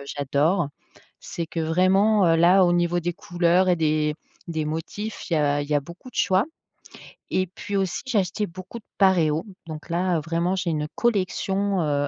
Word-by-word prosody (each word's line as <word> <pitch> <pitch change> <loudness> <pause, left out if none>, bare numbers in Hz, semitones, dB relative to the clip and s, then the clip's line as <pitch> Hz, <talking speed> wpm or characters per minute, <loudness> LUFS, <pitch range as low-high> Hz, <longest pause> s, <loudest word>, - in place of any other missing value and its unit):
j'adore. 145 +4 0 0.5
C'est 170 -1 -5
que 165 - -4
vraiment, 185 +5 +3
heu, 165 - +4
là, 180 +3 +5
au 175 - +3
niveau 175 0 +1
des 175 +1 -2
couleurs 185 -2 +1
et 175 - +3
des 155 -1 +1 0.3
des 160 -2 -2
motifs, 175 +8 -5
il 170 - +2
y - - +3
a 145 -1 +2
il 145 - -8
y - - +2
a 145 - +3
beaucoup 170 - -12
de - - -29
choix 190 +2 +3 0.9
et 185 - +1
puis, 200 +3 -6
aussi, 190 -2 -1
j'ai 240 -5 0
acheté 200 +3 -2
beaucoup 185 +6 -9
de - - -26
paréos, 170 -4 +3 0.2
donc 155 +1 -8
là, 175 0 +1
heu, - - -2
vraiment, 170 +3 0
j'ai 180 -3 -1
une 150 -1 -2
collection, 200 -3 0
heu. 145 -2 0
175 Hz, 195 wpm, -24 LUFS, 155-190 Hz, 0.9 s, là